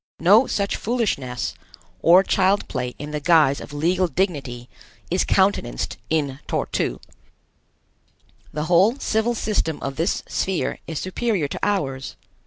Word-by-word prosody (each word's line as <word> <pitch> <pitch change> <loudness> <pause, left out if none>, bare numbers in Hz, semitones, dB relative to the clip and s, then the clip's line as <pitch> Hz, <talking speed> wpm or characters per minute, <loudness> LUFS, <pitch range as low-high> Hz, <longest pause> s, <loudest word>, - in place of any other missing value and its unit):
No 205 +10 +6
such 200 -1 -1
foolishness, 195 - -2 0.5
or 180 +3 +7
child 195 +1 +2
play 125 0 -4
in 150 +1 -7
the 150 - -2
guise 150 -3 +4
of - - -9
legal 175 +5 +1
dignity, 140 -10 -2 0.4
is 180 - +2
countenanced 190 - +1
in 145 -4 -1
Tor - - -1
tu. - - -2 1.5
The 150 - -3
whole 185 - +4
civil 225 -1 0
system 205 -8 -1
of 135 0 -4
this 165 +5 0
sphere 190 -2 -1
is 160 - -4
superior 185 -2 -1
to - - -5
ours. 135 -10 -1
170 Hz, 135 wpm, -22 LUFS, 145-200 Hz, 1.5 s, or